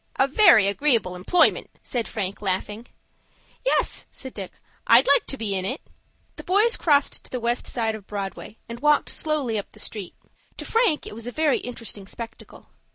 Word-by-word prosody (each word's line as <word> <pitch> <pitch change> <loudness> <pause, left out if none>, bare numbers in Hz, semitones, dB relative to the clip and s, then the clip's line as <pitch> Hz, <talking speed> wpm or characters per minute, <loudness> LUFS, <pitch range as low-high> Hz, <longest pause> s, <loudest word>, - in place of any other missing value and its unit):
"A 270 - +3
very 305 - +6
agreeable 210 -3 +1
employment," 185 - +2
said 240 -3 -3
Frank, 200 -3 -4
laughing. 205 +4 -3 0.8
"Yes," - - +2
said 260 -2 -6
Dick, 195 -3 -7 0.4
"I'd 235 +3 +7
like 280 - +3
to 270 - -2
be 215 -4 -3
in 190 -1 -2
it." 255 +10 -2 0.6
The - - -8
boys 420 +6 +3
crossed 285 -3 +2
to - - -11
the 250 - -4
West 235 +1 -1
side 225 -2 -1
of 215 -3 -10
Broadway, 200 +1 -6
and 235 0 -8
walked 295 +1 +3
slowly 285 -8 -1
up 200 - -8
the - - -14
street. 205 -5 -6 0.4
To - - -7
Frank 450 -10 +1
it - - -8
was 230 +2 -6
a - - -4
very 305 0 +1
interesting 230 -5 -7
spectacle. 230 +2 -10
235 Hz, 180 wpm, -24 LUFS, 205-290 Hz, 0.8 s, I'd